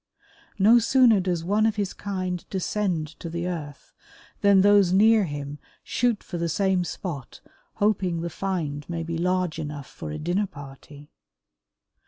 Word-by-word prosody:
No 220 +5 +6
sooner 235 -2 +5
does 180 -3 -1
one 210 +5 +2
of 220 - 0
his 200 -2 -2
kind 185 -3 -4
descend 185 -4 -1
to 170 - -6
the 170 +1 -3
earth 150 -5 -7 0.5
than 200 -1 +6
those 200 -2 +5
near 215 +2 +5
him 145 -1 -6 0.2
shoot 240 -3 0
for 175 - -6
the 170 0 -1
same 190 +2 +1
spot 165 -6 -6 0.4
hoping 190 -5 +1
the 170 - -3
find 155 -7 -3
may 170 -1 -3
be 165 0 -4
large 180 -2 0
enough 145 -2 -5
for 75 - -9
a 75 - -4
dinner 180 +6 -1
party. 145 0 -12
180 Hz, 155 wpm, -25 LUFS, 160-200 Hz, 0.5 s, No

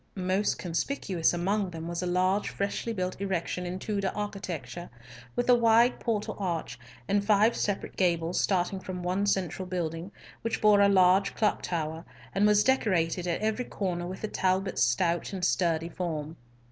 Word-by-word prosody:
Most 190 +2 0
conspicuous 180 - 0
among 190 +3 0
them 165 -1 -7
was 170 0 -3
a 180 - -2
large 185 +3 +1
freshly 200 +3 -2
built 185 -3 -3
erection 180 -2 -2
in 180 +1 -4
Tudor 200 -1 -2
architecture, 175 -7 -5 0.5
with 245 - 0
a 250 - +7
wide 235 +1 +4
portal 215 -3 -2
arch, 165 -10 -3 0.3
and 200 0 +2
five 215 +2 +4
separate 205 -2 -2
gables 170 -2 +1
starting 190 0 0
from 185 -1 -6
one 185 +3 0
central 185 -1 -1
building, 170 0 -3 0.3
which 230 0 -2
bore 210 -1 +5
a 200 - +6
large 190 0 +4
clock 215 - +1
tower, 160 -1 -3 0.3
and 200 +2 +3
was 210 0 +5
decorated 180 -9 +1
at 170 - -1
every 220 +3 -1
corner 175 -3 -3
with 185 +1 -7
the 215 - -2
Talbots' 190 -1 0
stout 170 - +1
and 185 -2 -1
sturdy 170 -3 +1
form. 160 -3 -4
185 Hz, 165 wpm, -28 LUFS, 175-205 Hz, 0.5 s, a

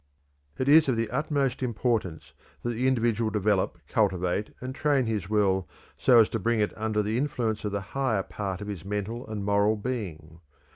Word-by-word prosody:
It 130 - -1
is 150 0 +6
of 120 - +1
the 115 -1 -1
utmost 140 -2 0
importance 105 - -1 0.3
that 120 - -1
the 120 +3 0
individual 115 -3 +1
develop, 105 -4 +1
cultivate, 95 0 0
and 130 +1 -5
train 140 -2 +1
his 105 -5 -2
will 95 -5 +1 0.3
so 125 -2 +5
as 110 - +2
to 115 - -2
bring 115 0 +1
it 105 - +1
under 110 -1 0
the 110 +3 0
influence 120 -6 -1
of 105 - -1
the 100 0 -2
higher 130 -8 +1
part 95 -1 -5
of 105 - -6
his 100 -6 -5
mental 105 +4 -4
and 105 -2 -4
moral 100 +1 +3
being. 90 -9 -5
110 Hz, 185 wpm, -27 LUFS, 100-120 Hz, 0.3 s, is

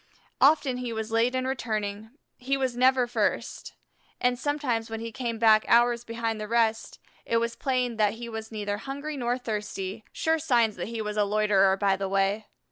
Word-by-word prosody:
Often 275 -3 +4
he 250 -1 -4
was 220 0 -4
late 230 +3 +2
in 255 0 -1
returning; 215 -5 -3 0.3
he 270 +2 0
never 260 0 +2
was 240 - -5
first, 220 -4 -2 0.4
and 245 0 +1
sometimes 260 -7 -1
when 225 0 -4
he 230 0 -5
came 235 -1 -3
back 220 -1 +5
hours 240 0 +4
behind 230 -2 -3
the 210 - -4
rest, 225 0 0 0.3
it 230 - 0
was 230 0 -1
plain 250 -4 -1
that 210 -2 +2
he 235 +1 -7
was 220 -1 -7
neither 205 -2 -3
hungry 285 +4 -5
nor 245 -2 -1
thirsty, 210 -3 -4
sure 320 0 0
signs 235 -7 +2
that - - -4
he 225 -1 -4
was 210 0 -4
a 210 - +4
loiterer 200 -2 +3
by 195 -1 +2
the 195 0 -3
way. 195 +2 0
230 Hz, 190 wpm, -27 LUFS, 215-250 Hz, 0.4 s, back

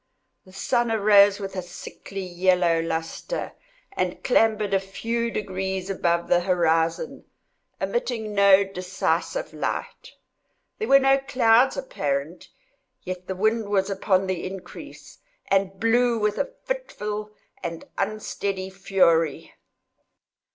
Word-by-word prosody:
The 185 - -16
sun 240 +5 0
arose 205 -2 +5
with 195 -1 -6
a 185 - -2
sickly 195 +2 -8
yellow 180 -1 +2
lustre, 165 - -4 0.4
and 185 - -3
clambered 215 -5 +2
a 195 - +4
very 195 0 -15
few 235 +3 -1
degrees 190 -2 -3
above 170 -2 0
the 175 - +4
horizon—emitting 180 - -2
no 200 -1 +6
decisive 195 - -2
light. - - -4 0.7
There 440 - -2
were 275 - +7
no 270 0 +4
clouds 255 -2 +3
apparent, 145 - -3 0.5
yet 180 0 -6
the 190 - -3
wind 220 +2 0
was 200 -1 +1
upon 195 -1 +1
the 185 -2 -3
increase, 190 0 -9 0.3
and 195 -1 +1
blew 235 +1 +3
with 210 -1 0
a - - -1
fitful 210 - -4 0.3
and 170 -2 -5
unsteady 200 -3 -3
fury. 170 -5 +1
195 Hz, 115 wpm, -24 LUFS, 185-225 Hz, 0.7 s, were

